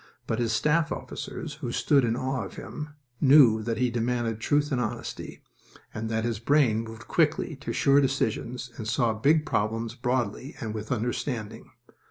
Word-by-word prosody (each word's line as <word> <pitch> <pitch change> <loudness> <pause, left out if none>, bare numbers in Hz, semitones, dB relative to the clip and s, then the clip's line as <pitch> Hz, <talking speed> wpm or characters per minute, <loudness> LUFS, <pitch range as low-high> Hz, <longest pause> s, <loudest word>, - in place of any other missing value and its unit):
But 110 - -1
his 115 -2 +1
staff 150 +8 +2
officers, 150 -2 -6
who 120 -4 -3
stood 140 +2 +3
in 115 -1 +1
awe 130 -1 -2
of 95 - -9
him, 150 -1 -7 0.3
knew 130 -6 +7
that 115 +1 -2
he 125 -1 +1
demanded 120 -1 -1
truth 145 +5 +1
and 125 -3 +1
honesty, - - -5 0.5
and 110 0 -4
that 110 0 0
his 115 -3 -1
brain 125 -3 +3
moved 115 0 -8
quickly 160 0 +1
to 145 - -5
sure 140 0 +4
decisions 125 -2 -1
and 110 - -5
saw 115 0 +2
big 150 +8 +3
problems 115 +2 -1
broadly 125 +2 -2
and 110 -2 -4
with 110 0 -6
understanding. 120 -1 -3
120 Hz, 170 wpm, -27 LUFS, 110-140 Hz, 0.5 s, knew